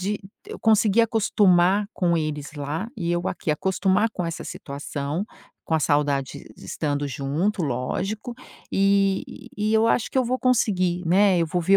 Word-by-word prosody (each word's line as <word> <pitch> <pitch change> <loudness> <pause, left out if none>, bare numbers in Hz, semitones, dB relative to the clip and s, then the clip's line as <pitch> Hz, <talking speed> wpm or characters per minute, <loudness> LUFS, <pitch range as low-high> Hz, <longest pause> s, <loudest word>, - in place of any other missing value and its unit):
de 205 +3 -2 0.3
eu - - -8
conseguir 220 0 +4
acostumar 200 -3 +3
com 170 -2 +1
eles 150 -2 -3
lá 150 +8 -4
e 175 -4 -1
eu 175 +1 -1
aqui, 165 - -3
acostumar 190 +6 +1
com 180 - -4
essa 165 -1 -4
situação, 145 +5 -5 0.4
com 160 - 0
a 160 - +2
saudade 145 -3 0
de - - -14
estando 145 -1 -2
junto, 145 - -1
lógico. 190 - -3 0.4
E 195 0 +1
e 215 +2 0
eu 220 +1 +4
acho 230 - +1
que - - -6
eu 260 - +3
vou 255 +2 -1
conseguir, 195 -8 +1
né. 190 +2 +4
Eu 170 - +2
vou 175 +3 -1
ver 190 +4 +4
180 Hz, 170 wpm, -24 LUFS, 150-210 Hz, 0.4 s, conseguir